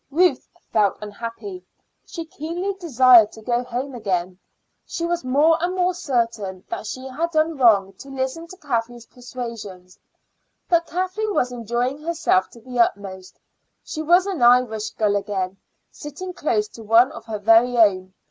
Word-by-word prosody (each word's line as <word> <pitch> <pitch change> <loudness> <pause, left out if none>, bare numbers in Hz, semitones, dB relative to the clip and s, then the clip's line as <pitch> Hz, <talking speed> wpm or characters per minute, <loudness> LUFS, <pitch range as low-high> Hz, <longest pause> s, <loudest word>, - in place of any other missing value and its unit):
Ruth 350 +6 +2 0.2
felt 205 -3 +2
unhappy; 230 - -7 0.4
she 335 -4 -6
keenly 335 +5 -4
desired 255 - +5
to 220 - -12
go 240 +1 0
home 250 +3 -4
again. 185 -5 -2 0.4
She 335 - -4
was 345 0 -1
more 300 +6 +3
and 360 +1 -1
more 365 0 +1
certain 230 - -2
that 215 - -4
she 255 +4 -6
had 310 +6 -2
done 315 0 +1
wrong 205 -7 +4
to 275 - -11
listen 270 +5 -4
to 370 - -12
Kathleen's 240 -6 -3
persuasions. 230 -8 -9 0.7
But 340 -1 +2
Kathleen 375 +4 -2
was 250 - +1
enjoying 245 +4 -2
herself 320 - +1
to 235 - -16
the 250 +1 -6
utmost. 195 -4 -1 0.4
She 310 - -5
was 350 +4 +4
an 380 -8 -3
Irish 240 -3 +4
girl 210 -2 +1
again, 195 -2 -2 0.3
sitting 330 +6 -8
close 215 -11 0
to 230 - -12
one 225 +4 +4
of 230 -1 -10
her 220 -2 -4
very 225 +4 +4
own. 185 -4 +3
245 Hz, 155 wpm, -22 LUFS, 215-320 Hz, 0.7 s, desired